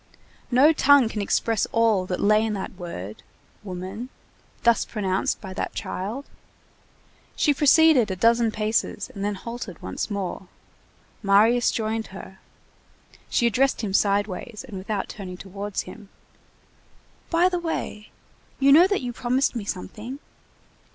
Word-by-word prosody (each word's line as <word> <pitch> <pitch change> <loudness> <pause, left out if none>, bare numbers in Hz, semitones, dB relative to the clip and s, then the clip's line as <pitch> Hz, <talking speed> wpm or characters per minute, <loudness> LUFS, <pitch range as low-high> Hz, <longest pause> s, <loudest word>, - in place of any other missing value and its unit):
No 275 +6 +5
tongue 285 -5 +5
can 215 - -3
express 220 +2 0
all 220 -5 +2
that 180 - -3
lay 215 +1 +4
in 220 -1 -1
that 195 -2 -4
word, 140 - -8 0.4
woman, 190 +5 -6 0.5
thus 235 -1 +4
pronounced 195 -3 -1
by 190 -3 -8
that - - -4
child. 220 +10 -4 1.1
She 295 - +3
proceeded 295 -4 +5
a 190 - -2
dozen 230 +4 +3
paces 215 +1 -1
and 195 - -6
then 205 0 -1
halted 230 -3 -7
once 95 - -4
more; 195 -2 -4 0.7
Marius 220 +4 +4
joined 220 0 -2
her. 190 0 -11 0.9
She 240 - +2
addressed 255 +3 +2
him 205 -4 -3
sideways, 205 +3 0
and 215 - -9
without 200 +1 -3
turning 185 -3 -8
towards 200 +1 -5
him:— 195 +2 -12 1.2
"By 340 +1 +4
the 360 -1 -1
way, 320 -10 -4 0.5
you 275 0 +5
know 335 +6 +8
that 400 0 0
you 245 -1 -4
promised 250 +3 0
me 220 -4 -4
something?" 215 +6 -6
215 Hz, 140 wpm, -24 LUFS, 195-245 Hz, 1.2 s, know